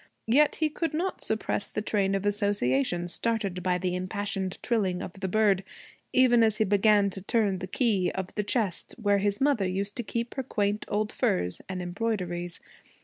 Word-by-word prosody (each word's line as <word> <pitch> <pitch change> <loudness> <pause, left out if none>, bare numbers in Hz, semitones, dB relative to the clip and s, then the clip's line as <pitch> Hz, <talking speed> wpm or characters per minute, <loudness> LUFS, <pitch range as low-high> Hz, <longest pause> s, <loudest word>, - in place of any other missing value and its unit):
Yet 285 +6 +4
he 315 -1 +1
could 325 0 -2
not 365 +4 -2
suppress 220 -2 -1
the 210 - -3
train 195 -2 +1
of 195 +1 -2
association 175 - +1
started 200 -2 -1
by 180 0 +1
the 180 0 -1
impassioned 190 0 -3
trilling 195 -7 0
of - - -6
the 190 0 -4
bird, 200 -1 +3 0.5
even 250 -2 +5
as 220 -2 +3
he 220 - +3
began 205 0 +4
to 195 - -2
turn 200 -2 +1
the 185 - -5
key 200 -3 +1
of 190 -1 -4
the 210 - 0
chest 210 -4 -1
where 205 -2 +2
his 200 0 0
mother 270 -9 +2
used 195 +2 -3
to 240 - -1
keep 235 +2 -3
her 265 - -3
quaint 210 -3 -1
old 215 +1 -1
furs 90 0 0
and 185 -1 -3
embroideries. 175 -3 -3
200 Hz, 185 wpm, -28 LUFS, 185-220 Hz, 0.5 s, even